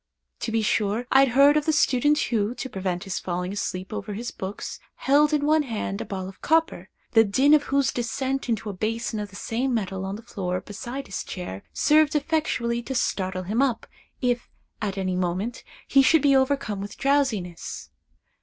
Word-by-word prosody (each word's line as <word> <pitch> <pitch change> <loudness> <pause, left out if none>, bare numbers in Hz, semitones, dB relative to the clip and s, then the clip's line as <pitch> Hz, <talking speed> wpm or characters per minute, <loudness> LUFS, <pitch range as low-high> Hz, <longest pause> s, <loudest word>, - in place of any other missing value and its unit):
To 225 - -3
be 225 -1 +1
sure, 215 +2 +1
I 265 - +7
had 275 - +6
heard 285 +2 +7
of 300 - -1
the - - +5
student 290 0 +3
who, 225 -4 0
to 265 - -5
prevent 185 -4 -3
his 195 - -3
falling 180 +1 -3
asleep 190 -1 -4
over 205 -1 -4
his 235 +3 -4
books, 190 +2 -6 0.2
held 290 +3 +3
in 295 -1 +1
one 310 +1 +4
hand 220 -6 -3
a - - -4
ball 190 -2 -5
of 190 - -12
copper, 325 +3 +1 0.2
the 225 -1 +6
din 260 +8 +4
of 300 -1 +5
whose 275 -2 +2
descent 265 +2 -2
into 220 -2 -1
a - - -8
basin 220 +3 -2
of 205 -1 -4
the 195 - -15
same 245 +5 -1
metal 190 -3 -2
on 195 +1 -3
the 220 - -10
floor 185 -5 -3
beside 240 +8 -6
his 195 - -4
chair, 100 - -6
served 305 +1 +3
effectually 285 -6 0
to 265 +2 -5
startle 185 -5 -1
him 215 +7 0
up, 255 -5 +1 0.4
if, 245 -1 0 0.3
at 200 -2 -2
any 185 -1 -1
moment, 185 +7 -2 0.2
he 275 - +5
should 310 +2 +4
be 280 -1 +5
overcome 265 -6 +1
with 200 0 -7
drowsiness. 255 -12 -1
230 Hz, 195 wpm, -25 LUFS, 195-275 Hz, 0.4 s, I